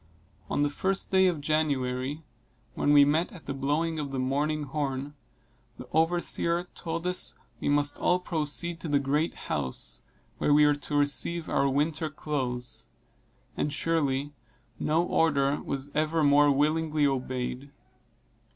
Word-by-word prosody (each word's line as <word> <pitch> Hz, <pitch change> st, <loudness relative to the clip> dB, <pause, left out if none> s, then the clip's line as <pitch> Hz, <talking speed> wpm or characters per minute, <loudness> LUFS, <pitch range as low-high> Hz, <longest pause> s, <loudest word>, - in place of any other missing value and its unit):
On 145 Hz, -, +1 dB
the 145 Hz, -, +2 dB
first 190 Hz, +6 st, -1 dB
day 190 Hz, 0 st, +5 dB
of 170 Hz, -5 st, -1 dB
January, 145 Hz, -1 st, -1 dB, 0.5 s
when 145 Hz, -, +1 dB
we 145 Hz, -1 st, +7 dB
met 155 Hz, +5 st, +1 dB
at 170 Hz, -, -13 dB
the 140 Hz, -, -3 dB
blowing 150 Hz, +4 st, -1 dB
of 145 Hz, -2 st, -3 dB
the 135 Hz, -, -4 dB
morning 145 Hz, +4 st, 0 dB
horn, 140 Hz, -1 st, -3 dB, 0.6 s
the 125 Hz, -, -10 dB
overseer 170 Hz, +1 st, +1 dB
told 165 Hz, 0 st, -5 dB
us 180 Hz, 0 st, +2 dB, 0.2 s
we -, -, -1 dB
must 145 Hz, 0 st, +1 dB
all 180 Hz, -, +3 dB
proceed 170 Hz, 0 st, -2 dB
to 165 Hz, -, -5 dB
the 145 Hz, -1 st, +2 dB
great 145 Hz, +4 st, 0 dB
house, 65 Hz, -3 st, -1 dB, 0.4 s
where 145 Hz, -, +3 dB
we 150 Hz, 0 st, +6 dB
were 150 Hz, -, +4 dB
to 145 Hz, +1 st, -5 dB
receive 145 Hz, +3 st, +2 dB
our 140 Hz, 0 st, +1 dB
winter 155 Hz, +3 st, 0 dB
clothes; 130 Hz, -5 st, -4 dB, 0.7 s
and 150 Hz, -, -1 dB
surely, 145 Hz, -3 st, 0 dB, 0.5 s
no 160 Hz, +3 st, +1 dB
order 145 Hz, -5 st, +1 dB
was 140 Hz, +1 st, -4 dB
ever 155 Hz, +1 st, +1 dB
more 145 Hz, 0 st, +5 dB
willingly 155 Hz, +2 st, +2 dB
obeyed. 130 Hz, 0 st, -2 dB
145 Hz, 145 wpm, -28 LUFS, 140-160 Hz, 0.7 s, we